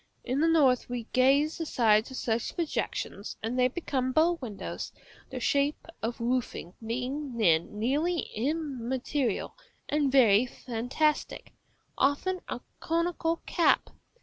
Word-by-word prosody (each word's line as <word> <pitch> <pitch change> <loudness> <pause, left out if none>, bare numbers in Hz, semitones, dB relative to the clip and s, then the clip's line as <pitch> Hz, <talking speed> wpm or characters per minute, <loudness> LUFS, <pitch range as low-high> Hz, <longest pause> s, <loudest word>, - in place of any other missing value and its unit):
In 255 +2 -1
the 320 - +4
north 275 -8 +4
we 245 -1 -3
glaze 275 +5 +3
the 325 - -2
sides 220 -4 +3
of 260 - -7
such 225 -1 -1
projections, 305 - -3
and 235 +3 -1
they 250 - +5
become 260 -2 -2
bow 335 +4 +3
windows, 220 -6 -5 0.4
the - - -5
shape 285 +1 +1 0.2
of 230 +2 -3
roofing 235 -7 -2
being 255 +3 -3
then 170 -2 +2
nearly 300 +10 +1
immaterial 265 0 -2 0.3
and 290 -2 +1
very 240 -3 +5
fantastic, 255 +6 -2 0.5
often 325 +7 +1
a - - -4 0.2
conical 335 0 -1
cap. 340 - +2
260 Hz, 125 wpm, -29 LUFS, 235-305 Hz, 0.5 s, they